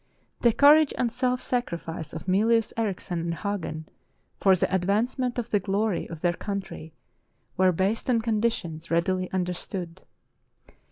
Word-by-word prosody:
The 235 - +4
courage 295 +4 +6
and 240 -2 0
self 250 +1 0
sacrifice 170 - -3
of 160 - -7
Mylius 220 +4 +2
Erichsen 195 -5 -2
and 170 0 -2
Hagen 165 -6 -4 0.5
for 195 -1 +5
the 185 - -1
advancement 230 +7 0
of 240 -1 -3
the 205 - +3
glory 195 +1 -1
of 165 -2 -8
their 175 -1 +2
country 190 -5 -6 0.6
were 185 0 +4
based 195 +8 -1
on 240 -2 +3
conditions 215 -8 -1
readily 185 +2 0
understood. 180 -1 -4
195 Hz, 135 wpm, -26 LUFS, 175-230 Hz, 0.6 s, courage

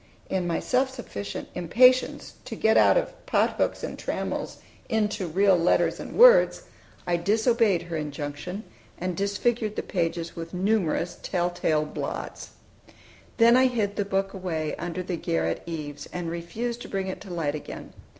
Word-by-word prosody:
In 185 -2 0
my 170 - 0
self 260 +1 +1
sufficient 100 - -6
impatience 250 +9 +3
to - - -6
get 220 0 +3
out - - +6
of - - -1
"pothooks - - +1
and - - -5
trammels" - - -3 0.3
into 210 -4 0
real 190 +3 +4
letters 170 0 +2
and - - -7
words - - +7 0.4
I 175 -1 +1
disobeyed 220 +1 +2
her 170 -1 -6
injunction, 150 +6 -5 0.3
and 180 0 -3
disfigured 210 +3 0
the - - -2
pages 170 -2 -2
with 165 +1 -7
numerous 180 -3 0
tell 180 -1 -1
tale 155 -3 +1
blots. 150 - -5 0.9
Then 235 +1 +6
I 260 +1 +6
hid 215 -5 -1
the 205 - 0
book 195 0 -1
away 165 -5 -3
under 175 +2 -4
the 180 -1 -3
garret 80 - -1
eaves, 145 -3 -6
and 175 -2 -4
refused 225 +8 -4
to - - -8
bring 195 -1 -2
it 190 - -5
to - - -10
light 160 -4 -1
again. 150 - -8
185 Hz, 160 wpm, -26 LUFS, 165-220 Hz, 0.9 s, words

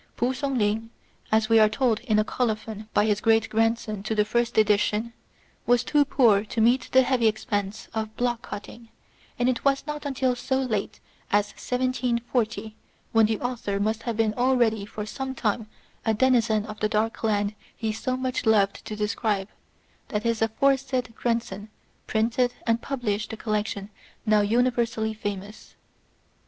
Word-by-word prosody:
P'u 245 +3 +1
Sung 275 0 -2
ling, 220 +1 0 0.4
as 220 0 +3
we 225 0 +5
are 215 -1 +6
told 235 -1 +1
in 235 -3 0
a 215 - +4
colophon 220 -2 -3
by 205 - +3
his 210 -1 +1
grandson 225 -1 +1
to 215 +2 -2
the 210 -1 +3
first 235 +2 0
edition, 215 +2 +2 0.5
was 245 -1 +4
too 295 -1 +3
poor 225 -8 +4
to 225 - -4
meet 235 +2 +3
the 260 0 +6
heavy 250 -3 +2
expense 210 -2 -2
of 220 -1 -4
block 240 -1 0
cut 205 - -6
ting; 230 -1 -13 0.5
and 245 - +1
it 255 -2 0
was 275 -1 +2
not 300 0 -5
until 265 -2 0
as 245 +2 -7
late 240 -6 -1 0.3
as 205 0 +3
1740, 240 -3 -1 0.4
when 225 -1 +5
the 220 -1 -1
author 235 -5 -2
must 220 +2 0
have 230 -2 -3
been 220 -2 +2
already 240 -4 +2
for 210 0 -6
some 265 +4 -5
time 220 -1 -1 0.4
a 220 -1 +1
denizen 225 -3 +3
of 215 0 -8
the 215 - +1
dark 220 +2 -1
land 205 -2 +1 0.2
he 220 -1 -1
so 255 +4 -2
much 255 -2 -2
loved 205 -2 +3
to 215 - -6
describe, 210 -1 -1 0.6
that 210 -1 -2
his 230 -1 0
aforesaid 255 +1 +1
grandson 230 -4 -2 0.4
printed 230 +3 +1
and 230 0 +1
published 215 -6 -2
the 225 - -6
collection 210 -2 -2 0.3
now 215 -1 +4
so 205 - +1
universally 235 -1 +1
famous. 205 0 -6
225 Hz, 165 wpm, -25 LUFS, 215-245 Hz, 0.6 s, are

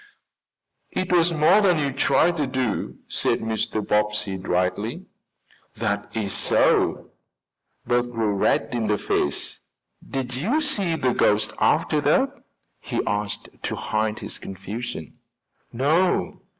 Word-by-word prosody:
"It 185 - -2
was 175 -1 +4
more 160 +6 +5
than 180 -4 +4
you 145 -2 0
tried 165 +5 +3
to 145 -3 0
do," 130 -4 -2
said - - +1
Mr. 110 -1 -2
Bobbsey 105 -1 +1
dryly. 90 -1 -1 0.7
"That 100 -2 -2
is 100 -3 -1
so." - - +2 0.7
Bert 120 0 +1
grew 110 -3 0
red 110 +3 +1
in 115 -3 -1
the 105 0 +2
face. 75 - -1 0.5
"Did 130 -2 -3
you 205 - 0
see 205 - 0
the 130 -5 +1
ghost 105 +1 +2
after 150 - +2
that?" 260 - +3 0.5
he - - -3
asked 105 0 -2
to - - -3
hide 110 0 -1
his - - -6
confusion. 100 - -7 0.5
"No." 155 +9 +1
120 Hz, 125 wpm, -24 LUFS, 105-155 Hz, 0.7 s, more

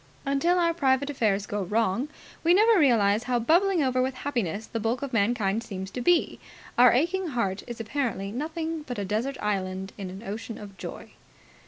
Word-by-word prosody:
Until 280 +6 +2
our 335 -1 +2
private 280 -2 +1
affairs 205 -7 +1
go 205 0 -3
wrong, 220 +6 0 0.3
we 340 +2 +5
never 435 +1 +5
realize 225 -6 +3
how 250 -1 +1
bubbling 340 - +3
over 255 -1 +1
with 260 0 -1
happiness 225 - -2
the 230 - -4
bulk 230 +4 -1
of 275 -2 -5
mankind 220 -1 +1
seems 190 -3 -6
to 250 - -4
be. 350 +6 +2 0.4
Our 245 0 +7
aching 345 +8 +1
heart 230 -9 -1
is 240 -1 -7
apparently 225 -4 -2
nothing 320 +5 -3
but 255 -5 -6
a 200 - -2
desert 225 +8 -2
island 190 -2 -2
in 190 -2 -5
an 190 +4 -9
ocean 225 +2 -6
of 200 -2 -10
joy. - - -8
240 Hz, 185 wpm, -27 LUFS, 205-285 Hz, 0.4 s, Our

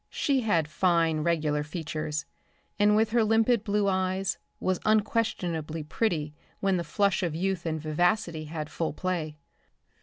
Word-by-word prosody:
She 275 -3 +1
had 170 -9 +1
fine 165 -1 +2
regular 155 -2 +1
features, 155 -1 -4 0.5
and 210 0 +5
with 220 0 +2
her 235 -1 +4
limpid 225 +1 +3
blue 205 -1 +1
eyes 190 -1 0 0.2
was 185 -1 0
unquestionably 180 -8 0
pretty 155 -3 -1 0.3
when 195 -1 +2
the 170 - -2
flush 200 +5 +1
of 170 -4 -1
youth 185 0 -1
and 160 -1 -1
vivacity 160 +1 0
had 155 0 -5
full 165 -3 -2
play. 160 -4 -3
175 Hz, 145 wpm, -28 LUFS, 155-205 Hz, 0.5 s, and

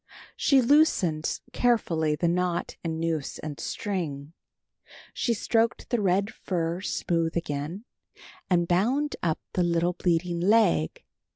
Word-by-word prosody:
She 270 -3 +4
loosened 215 - +2
carefully 165 -11 +1
the 170 - 0
knot 175 0 -1
and 160 -1 -3
noose 165 -3 -2
and 150 -2 -7
string. 160 -8 -4 0.8
She 235 -3 0
stroked 225 +2 0
the 240 -3 +1
red 195 +2 +1
fur 170 -1 -2
smooth 170 -4 -1
again, 160 +6 -4 0.6
and 175 -2 +2
bound 250 +12 +1
up 160 -3 0 0.2
the 180 - +1
little 175 0 +1
bleeding 175 0 0
leg. 195 - +2
175 Hz, 120 wpm, -27 LUFS, 165-205 Hz, 0.8 s, She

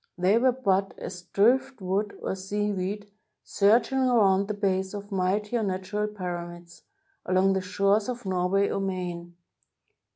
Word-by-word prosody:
They 190 +5 +3
were 255 +1 +4
but 195 -6 0
as 180 -1 -7
driftwood 210 -3 +1
or - - -1
seaweed, 205 +1 -3 0.3
surging 230 +6 +2
around 205 -7 +3
the 210 - -3
base 190 -1 -1
of 205 +1 -8
mightier 205 +5 0
natural 200 +1 -2
pyramids, 175 -3 -7 0.4
along 185 +1 +2
the 190 - 0
shores 200 +4 +1
of 245 -3 -5
Norway 190 +2 +1
or - - -2
Maine. 175 -3 -4
195 Hz, 130 wpm, -26 LUFS, 185-210 Hz, 0.4 s, were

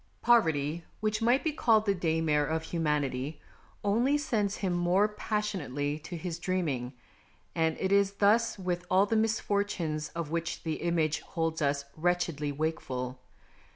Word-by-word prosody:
Poverty, 160 -9 +3 0.2
which 215 +1 -1
might 240 +4 +3
be 320 - +1
called 225 -7 +3
the 200 - +3
daymare 160 -4 +1
of 160 0 -1
humanity, 150 -4 -1 0.4
only 235 +8 +3
sends 215 -8 0
him 190 -3 -1
more 175 +4 +3
passionately 190 - -2
to 170 +3 -7
his 170 0 -5
dreaming, 155 -9 -1 0.6
and 160 -1 +1
it 190 - 0
is 200 0 +4
thus 215 +4 +3
with 180 -2 -2
all 190 +2 +5
the 225 - 0
misfortunes 200 -8 0
of 165 -3 -4
which 170 0 -2
the 160 -1 -2
image 165 -2 +1
holds 165 -1 -3
us 140 -1 +1
wretchedly 165 -3 0
wakeful. 130 -4 -3
170 Hz, 145 wpm, -30 LUFS, 155-205 Hz, 0.6 s, all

